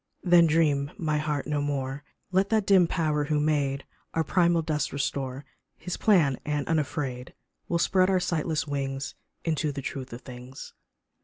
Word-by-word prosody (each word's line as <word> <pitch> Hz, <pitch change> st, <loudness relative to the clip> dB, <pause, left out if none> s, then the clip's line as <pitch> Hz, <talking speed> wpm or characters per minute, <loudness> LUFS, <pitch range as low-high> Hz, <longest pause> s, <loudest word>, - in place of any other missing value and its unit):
Then 175 Hz, -2 st, +6 dB
dream, 150 Hz, -3 st, +2 dB
my 155 Hz, -2 st, 0 dB
heart, 150 Hz, -2 st, -2 dB
no 150 Hz, -1 st, -1 dB
more 140 Hz, -1 st, -2 dB, 0.3 s
Let 190 Hz, +1 st, +2 dB
that 220 Hz, -3 st, +2 dB
dim 190 Hz, -4 st, +5 dB
Power 155 Hz, -4 st, 0 dB
who 150 Hz, 0 st, +1 dB
made 145 Hz, -2 st, 0 dB, 0.3 s
Our 165 Hz, -, +2 dB
primal 170 Hz, +1 st, +2 dB
dust 155 Hz, -2 st, -1 dB
restore 135 Hz, -1 st, -3 dB, 0.3 s
His 180 Hz, +1 st, -4 dB
plan, 160 Hz, -, +3 dB
and 150 Hz, -1 st, -2 dB
unafraid 140 Hz, -5 st, -2 dB, 0.3 s
We'll 170 Hz, -, +2 dB
spread 185 Hz, +2 st, +3 dB
our 190 Hz, -1 st, +3 dB
sightless 160 Hz, -3 st, -1 dB
wings 135 Hz, -1 st, -3 dB, 0.3 s
Into 155 Hz, -2 st, 0 dB
the 140 Hz, -1 st, -6 dB
truth 130 Hz, -1 st, -5 dB
of 120 Hz, +2 st, -8 dB
things. 125 Hz, +1 st, -10 dB
150 Hz, 160 wpm, -27 LUFS, 140-165 Hz, 0.3 s, Then